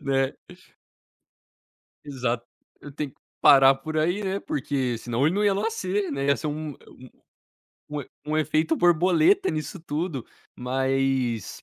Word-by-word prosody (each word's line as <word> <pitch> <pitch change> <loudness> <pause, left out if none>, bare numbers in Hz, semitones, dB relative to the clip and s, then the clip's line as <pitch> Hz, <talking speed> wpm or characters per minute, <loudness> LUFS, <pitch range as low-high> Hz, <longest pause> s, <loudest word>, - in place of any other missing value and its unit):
né. 135 -1 +1 1.7
Exato, 125 -4 -2 0.4
eu 145 - -10
tenho 145 0 -4
que - - -31 0.2
parar 135 -1 +8
por 155 +4 -6
aí, 175 +6 +1
né. 195 0 -2
Porque 130 -3 -2
senão 120 +4 0
ele 160 - +2
não 205 +1 +1
ia 200 -1 +3
nascer, 200 -1 -1
né. 140 0 -2
Ia 140 0 +3
ser - - -5
um, 150 0 -4 1.1
um 150 0 -4
e 140 - -10 0.2
um 155 +1 -1
efeito 155 +1 +1
borboleta 180 - +4
nisso 155 +4 -4
tudo. 155 -4 -4 0.3
Mas, 130 -2 -1
150 Hz, 140 wpm, -25 LUFS, 135-175 Hz, 1.7 s, parar